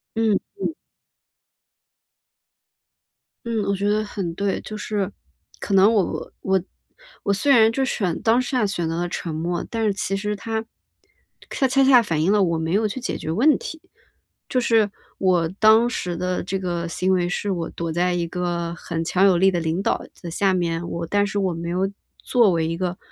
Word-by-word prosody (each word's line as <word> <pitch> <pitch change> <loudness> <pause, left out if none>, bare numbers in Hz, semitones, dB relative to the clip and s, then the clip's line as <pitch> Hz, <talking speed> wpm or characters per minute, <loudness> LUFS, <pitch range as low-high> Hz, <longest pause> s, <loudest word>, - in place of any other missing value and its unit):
嗯， 220 -3 +2 0.2
嗯。 - - -1 2.7
嗯， 230 -2 -1
我 200 - +1
觉 200 +1 0
得 215 +1 +1
很 195 -5 -4
对。 200 +1 -1
就 215 - -8
是， 205 -2 -2 0.5
可 200 - -3
能 195 +3 +6
我 205 -4 -1
我 190 -1 +1 0.6
我 200 - +1
虽 280 +8 +2
然 225 -4 +6
就 265 +3 0
选 185 -9 -1
当 230 +3 +3
下 250 -3 0
选 175 -4 -2
择 165 - -2
了 175 +1 -1
沉 170 -2 -4
默， 170 +2 -2
但 225 -1 -1
是 210 - +2
其 195 0 -2
实 210 +1 -2
它 220 +2 -3 0.9
它 270 - 0
恰 270 +1 +3
恰 265 -2 +7
反 165 -7 -1
映 175 +5 +3
了 205 -1 +4
我 170 -2 +1
没 160 +1 -2
有 215 +3 +2
去 210 +5 -5
解 250 - -3
决 160 - -4
问 265 - +4
题。 320 - -8 0.7
就 255 - +1
是 225 -3 +3 0.3
我 180 -3 +2
当 220 +2 +6
时 180 -7 -3
的 180 0 -2
这 190 +1 -3
个 175 -2 -2
行 185 +3 0
为， 175 -1 +1
是 200 +3 -2
我 170 -3 -2
躲 170 -1 -4
在 180 +2 +1
一 175 -1 -1
个 170 -1 -2
很 165 0 -4
强 185 +4 +3
有 190 -3 +5
力 190 +2 +5
的 175 - 0
领 165 +3 -1
导 - - 0 0.2
的 175 - -6
下 190 +3 +1
面， 170 -1 -1
我 170 0 -4
但 205 +4 +2
是 205 0 -2
我 190 -3 0
没 170 +1 -5
有 185 +2 0 0.3
作 235 -5 +3
为 165 -2 0
一 165 - -2
个 180 +1 -3
190 Hz, 210 characters per minute, -23 LUFS, 170-215 Hz, 2.7 s, 恰